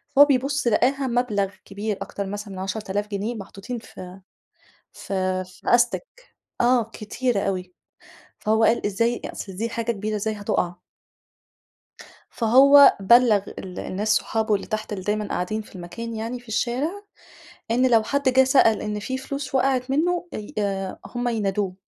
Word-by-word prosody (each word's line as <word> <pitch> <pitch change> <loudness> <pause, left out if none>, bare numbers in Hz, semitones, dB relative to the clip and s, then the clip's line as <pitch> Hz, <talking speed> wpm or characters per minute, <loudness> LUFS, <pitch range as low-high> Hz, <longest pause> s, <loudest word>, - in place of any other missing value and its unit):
فهو 285 +1 +9
بيبُص 275 -1 0
لقاها 265 +4 +2
مبلَغ 215 -5 0
كبير 205 +1 -4
أكتر 200 - -4
مثلًا 205 0 -6
من 185 - -7
10.000 205 +1 -3
جنيه 210 +3 -3
محطوطين 205 +4 -7
في 185 -3 -11 0.7
في 185 -1 -2
في 180 0 -18
أستِك، 240 - +1 0.6
آه 245 0 +4
كتيرة 235 +1 -1
أوي، 185 -2 -3 0.7
فهو 220 +1 +2
قال 225 0 +3
إزاي 230 +4 0
أ - - -5
أصل 190 -2 -8
دي 230 +4 -2
حاجة 230 0 -2
كبيرة، 215 0 -3
إزاي 215 +1 -1
هتُقَع. 200 -4 -1 1.6
فهو 275 +5 +7
بلّغ 220 0 +5 0.2
ال 185 -1 -8
الناس 205 +3 -3
صحابه 220 0 +1
اللي 195 - -2
تحت، 215 -1 -4
اللي 190 -2 -5
دايمًا 210 0 -1
قاعدين 215 +5 -2
في 210 - -18
المكان 230 +6 -7
يعني، 230 +3 -4
في 240 - -21
الشارع، 240 +7 0 0.8
إن 255 +2 +3
لو 225 -1 +5
حد 280 +5 -1
جِه 260 +1 +5
سأل 255 -5 +4
إن 210 0 -3
في 260 +5 -3
فلوس 270 0 -5
وقعِت 260 0 +1
منّه، 350 +4 +1
أي 210 - -7
آآ 195 -2 -2
هُم 245 0 -3
ينادوه. 200 -4 -1
220 Hz, 155 wpm, -24 LUFS, 200-250 Hz, 1.6 s, فهو